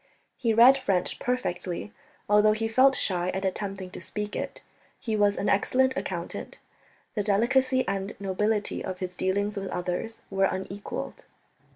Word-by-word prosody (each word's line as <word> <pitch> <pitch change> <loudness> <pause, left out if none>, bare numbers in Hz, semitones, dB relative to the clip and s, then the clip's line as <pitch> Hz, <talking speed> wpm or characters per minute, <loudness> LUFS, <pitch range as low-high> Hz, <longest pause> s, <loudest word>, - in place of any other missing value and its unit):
He 235 -3 0
read 245 +5 +7
French 195 -8 0
perfectly, 200 -6 -2 0.3
although 210 +1 +5
he 225 +1 -1
felt 260 +4 +5
shy 180 -2 0
at 190 +1 -2
attempting 190 -1 -3
to - - -8
speak 210 0 -5
it. - - -4 0.4
He 220 -2 -2
was 205 -1 +3
an 200 - -1
excellent 260 +6 +2
accountant. - - -5 0.6
The 210 - 0
delicacy 255 +6 +2
and 195 +1 -2
nobility 205 +2 0
of 185 -1 -4
his 180 -1 -5
dealings 200 +3 0
with 195 -1 -3
others 180 +5 -3
were 195 0 +3
unequalled. 190 +2 -4
205 Hz, 150 wpm, -27 LUFS, 190-225 Hz, 0.6 s, read